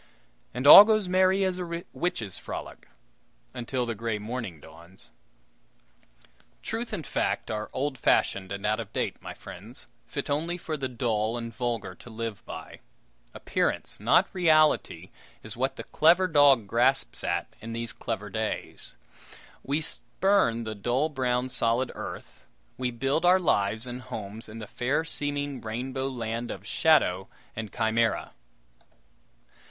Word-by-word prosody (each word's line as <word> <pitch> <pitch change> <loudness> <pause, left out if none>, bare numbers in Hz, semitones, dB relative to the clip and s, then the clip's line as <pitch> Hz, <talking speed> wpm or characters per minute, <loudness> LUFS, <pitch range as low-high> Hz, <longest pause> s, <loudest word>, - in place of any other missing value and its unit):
And 125 +3 -4
all 175 +7 +13
goes 215 -2 +2
merry 185 +1 +3
as 185 -1 0
a 170 -1 -4
witches' 115 - -2
frolic - - -8 0.7
until 125 0 -2
the 115 - -2
gray 115 0 -2
morning 105 -5 -5
dawns. 85 +5 -12 1.5
Truth 230 +2 -4
and 160 - -4
fact - - -1
are 110 0 -3
old 135 -1 -2
fashioned 95 -5 +2
and 100 0 -4
out 105 +1 +1
of - - -6
date, - - -2
my - - -8
friends, 110 +8 -11 0.2
fit 140 - -4
only 160 +5 -1
for 160 -2 -4
the 135 -3 -2
dull 115 -2 -1
and 115 -1 -6
vulgar 115 -4 -3
to 105 - -14
live 115 -2 -5
by. - - -8 0.6
Appearance, - - -1
not - - +4
reality, 155 -4 +3 0.3
is - - -7
what - - -1
the - - -7
clever 170 +4 +4
dog 145 - +5
grasps 100 - +1
at - - -2
in 115 - -7
these 115 0 -4
clever 105 -4 -5
days. 110 +1 -4 0.7
We 145 +4 -1
spurn 160 - +1
the 110 -1 -4
dull 120 +9 0
brown 130 -3 -1
solid 120 +1 +1
earth; - - -8 0.3
we 125 -1 -2
build 135 +6 -1
our 180 +1 +6
lives 110 - +1
and 125 0 -6
homes 110 -1 -7
in 110 - -9
the 110 - -6
fair 130 +9 -1
seeming 145 -2 -3
rainbow 130 +4 -3
land 115 -1 -4
of 95 +1 -7
shadow 105 - +3 0.3
and 110 -2 -5
chimera. 115 0 0
125 Hz, 145 wpm, -27 LUFS, 110-150 Hz, 1.5 s, all